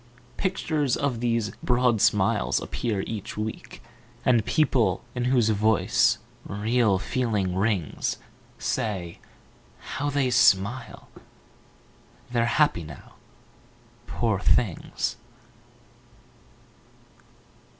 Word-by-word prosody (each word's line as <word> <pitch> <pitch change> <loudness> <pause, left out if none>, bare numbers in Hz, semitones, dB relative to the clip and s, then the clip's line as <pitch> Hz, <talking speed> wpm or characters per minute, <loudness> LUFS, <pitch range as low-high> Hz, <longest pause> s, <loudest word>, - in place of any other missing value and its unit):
Pictures 155 -8 0
of 135 -5 -1
these 115 -3 0
broad 120 -3 +2
smiles 60 -1 +2
appear 105 -5 -2
each 105 0 -6
week, 110 +1 -6 0.4
And 120 -4 +4
people 120 - +1
in 125 -1 -2
whose 125 -3 +3
voice 110 -1 +3 0.3
real 110 0 +1
feeling 105 -4 -1
rings 95 -5 -1 0.4
Say: 95 -9 -3 0.6
How 145 +2 -4
they 140 -3 0
smile! 115 +1 +2 1.2
They're 120 -1 +2
happy 145 - +2
now, 75 -4 -12 0.9
poor 110 -5 0
things. 100 -3 0
115 Hz, 85 wpm, -25 LUFS, 100-125 Hz, 1.2 s, And